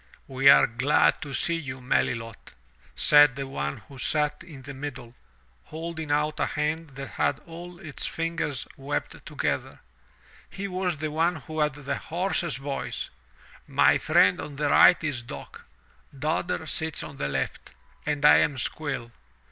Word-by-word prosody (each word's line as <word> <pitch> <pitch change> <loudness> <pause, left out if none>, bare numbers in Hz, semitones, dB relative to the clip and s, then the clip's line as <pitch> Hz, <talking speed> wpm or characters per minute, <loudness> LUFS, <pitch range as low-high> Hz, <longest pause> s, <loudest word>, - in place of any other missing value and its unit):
'*We 135 +1 +4
are 140 - +8
glad 130 +6 +2
to 145 - -6
see 170 +4 +1
you, 130 -5 -6
Melilot/* 115 -2 -2 0.4
said 145 -3 +6
the 135 0 -4
one 70 - -3
who 135 -2 -12
sat 150 +1 +1
in 140 -5 -12
the 140 +1 -8
middle, 130 -4 -7 0.5
holding 160 -1 -6
out 150 +1 0
a - - +1
hand 150 -1 -2
that 135 0 -6
had - - 0
all 175 +1 -10
of 190 - -12
its 150 - -3
fingers 165 -5 -2
webbed 140 +2 -4
to - - -11
gether. - - -2 0.7
He 200 +1 -5
was 180 -3 -2
the 155 +1 -3
one 165 +3 +1
who 155 +1 -7
had 150 -2 +1
the 145 -1 -3
hoarsest 170 -4 -1
voice. 135 0 -4 0.6
'*My - - +4
friend 95 - +4
on 145 - -7
the 145 0 0
right 175 - +7
is 145 -6 -1
Dock, 120 - -10 0.5
Dodder 155 +3 -1
sits 160 +1 -1
on 140 - -9
the - - -2
left, 70 -1 -3 0.3
and 150 -1 -1
I 150 - +9
am 145 - +2
Squill. 130 -4 -3
145 Hz, 165 wpm, -26 LUFS, 135-160 Hz, 0.7 s, I